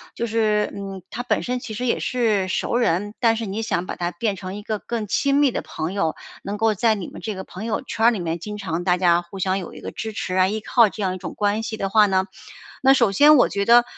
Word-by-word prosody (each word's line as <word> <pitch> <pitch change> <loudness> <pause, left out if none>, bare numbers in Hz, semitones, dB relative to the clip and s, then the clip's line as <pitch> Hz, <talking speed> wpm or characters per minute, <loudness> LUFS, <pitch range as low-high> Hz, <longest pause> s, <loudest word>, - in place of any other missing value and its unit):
就 235 - -2
是， 215 -2 +1
嗯， 195 -1 -6
他 240 - -4
本 250 - 0
身 250 0 -2
其 225 -2 -7
实 250 +4 -3
也 235 - +1
是 220 -6 +1
熟 - - -1
人， 205 -3 0
但 230 -2 +3
是 230 - -3
你 205 +2 -3
想 185 -5 -1
把 - - -5
他 175 0 -2
变 215 -2 -2
成 185 0 -6
一 210 - -6
个 215 -1 -3
更 230 -3 -4
亲 275 +7 +1
密 285 -2 +4
的 - - -3
朋 160 +3 -5
友， 165 -6 0 0.3
能 200 +1 -4
够 220 0 +2
在 220 +2 +2
你 195 -4 -6
们 - - -10
这 215 -3 -4
个 190 - -6
朋 185 - -9
友 225 -1 -1
圈 230 -3 -2
儿 240 - +6
里 220 - -3
面 170 -1 -3
经 210 +4 -6
常 175 -4 -3
大 180 -1 +3
家 175 -1 +3
互 175 +3 -11
相 190 +1 0
有 180 - -8
一 - - -10
个 - - -6
支 220 - -5
持 185 - -4
啊、 185 0 +4
依 215 - -2
靠 230 0 +4
这 210 - -8
样 185 -1 0
一 - - -6
种 185 - -7
关 205 +1 0
系 225 - -4
的 195 -2 -2
话 210 +1 +5
呢。 190 -1 +1 0.5
那 270 0 +6
首 235 -6 +3
先 295 +8 +7
我 250 - +5
觉 200 0 -1
得， 240 +2 +7
210 Hz, 300 characters per minute, -22 LUFS, 190-230 Hz, 0.5 s, 先